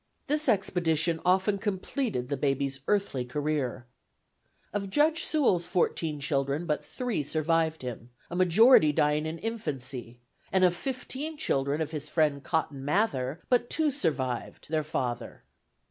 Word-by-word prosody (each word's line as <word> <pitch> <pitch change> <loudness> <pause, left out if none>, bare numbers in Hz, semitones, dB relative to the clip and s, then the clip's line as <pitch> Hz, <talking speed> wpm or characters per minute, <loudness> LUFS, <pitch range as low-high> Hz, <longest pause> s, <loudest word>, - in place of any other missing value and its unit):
This 300 +1 +1
expedition 170 -4 +2
often 190 +2 +2
completed 200 - -2
the 140 - -1
baby's 140 0 -1
earthly 200 -11 +1
career. 135 -1 -2 0.9
"Of 200 -1 -2
Judge 310 - +3
Sewall's 200 - +2
fourteen 165 -4 0
children 140 +2 -1
but 150 -3 -1
three 245 -9 -3
survived 160 +1 0
him, 125 -1 -6 0.2
a 170 - -7
majority 185 - +6
dying 150 +1 +1
in 160 +1 -4
infancy; 135 - -5 0.3
and 190 -1 +3
of 180 -1 +4
fifteen 270 - -4
children 140 - 0
of 155 -1 -2
his 150 -1 -4
friend 150 -4 +1
Cotton 145 -4 -2
Mather, 150 - 0
but 245 -1 +2
two 310 -2 +2
survived 135 - -2
their 155 -1 +1
father." 130 -6 -4
160 Hz, 135 wpm, -28 LUFS, 140-200 Hz, 0.9 s, majority